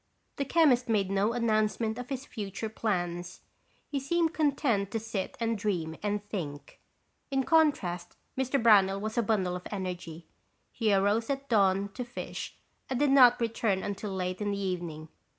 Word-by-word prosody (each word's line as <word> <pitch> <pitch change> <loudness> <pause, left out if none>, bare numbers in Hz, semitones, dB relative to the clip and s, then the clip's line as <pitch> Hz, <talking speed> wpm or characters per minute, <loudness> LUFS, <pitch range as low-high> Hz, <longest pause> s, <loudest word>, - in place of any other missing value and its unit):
The 280 - -1
chemist 265 -6 +3
made 200 -4 +1
no 200 +3 +2
announcement 220 -1 0
of 250 - -7
his 270 -1 -4
future 210 -2 -5
plans. 175 -5 -3 0.5
He 280 - -2
seemed 330 +4 +1
content 265 - +1
to 225 - -2
sit 215 -3 -4
and 230 -1 0
dream 180 -7 -2
and 205 0 -2
think. 150 -9 -6 0.5
In 270 -1 +1
contrast, 230 - +1 0.2
Mr. 265 +1 0
Brownell 200 -4 +5
was 215 +2 -4
a 240 - +3
bundle 195 -5 0
of 180 - -6
energy. 180 -4 -5 0.5
He 225 -3 0
arose 205 +3 +2
at 275 0 -2
dawn 200 -3 +3
to 250 - -4
fish 240 0 -6 0.3
and 260 -2 -1
did 290 -1 +3
not 250 -3 +7
return 225 -4 0
until 200 +1 -4
late 185 0 -3
in 205 - 0
the 200 - -1
evening. 170 -5 -4
215 Hz, 165 wpm, -29 LUFS, 190-245 Hz, 0.5 s, not